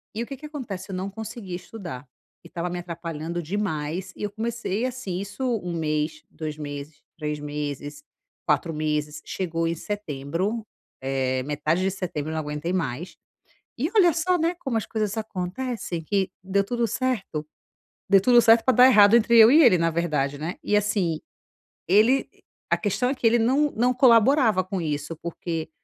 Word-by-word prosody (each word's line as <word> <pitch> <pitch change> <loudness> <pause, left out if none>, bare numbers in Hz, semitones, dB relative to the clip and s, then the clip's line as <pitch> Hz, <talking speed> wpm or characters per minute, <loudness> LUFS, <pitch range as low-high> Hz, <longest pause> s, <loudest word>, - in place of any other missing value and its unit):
E 225 - -2
o - - -6
que 275 - -6
que 300 +3 -11
acontece, 215 -11 -6
eu 185 - -3
não 190 +2 -3
conseguia 220 -3 -7
estudar, 175 - -8 0.4
e - - -12
estava 175 +1 -3
me 180 0 -4
atrapalhando 170 -1 -5
demais. 175 -1 -3
E - - -7
eu 205 - -2
comecei 230 0 -2
assim, 250 -8 -4
isso 200 +7 -6 0.2
1 175 -1 -4
mês, 155 -1 -2
2 155 -1 -6
meses, 145 0 -7 0.2
3 150 -1 -3
meses, 145 - -5 0.4
4 165 -3 +1
meses. 150 0 -2
Chegou 165 -3 -2
em 165 - -1
setembro, 190 +4 -3 0.3
eh, 130 -1 -1
metade 150 +5 0
de 190 - +1
setembro, 165 -5 -4
eu - - -4
não 160 - -1
aguentei 150 +4 -3
mais. 160 -1 -3 0.6
E 285 +7 0
olha 350 -5 +6
só, 355 +3 +1
né, 335 +2 0
como 250 -4 -1
as 220 - -2
coisas 215 -1 -2
acontecem 195 -2 -4
que 195 +3 0
deu 195 +1 +1
tudo 235 +3 -1
certo 210 -11 -2 0.6
deu 195 0 +6
tudo 240 +3 +6
certo 225 0 +5
para 260 - +4
dar 250 - +9
errado 210 -3 +7
entre 235 0 +4
eu 225 0 +9
e 305 +5 +7
ele, 210 -8 +7
na 165 0 +2
verdade, 150 -4 -1
né. 165 +6 -4
E 210 - +1
assim, 200 -6 0 0.7
ele 225 +8 +4 0.4
a - - +4
questão 235 +5 0
é - - +1
que 245 - -5
ele 235 +1 +4
não 270 +6 +3
não 245 +3 +2
colaborava 235 -4 +5
com 185 0 -4
isso, 150 0 -3
porque 165 -1 -4
185 Hz, 180 wpm, -25 LUFS, 155-225 Hz, 0.7 s, dar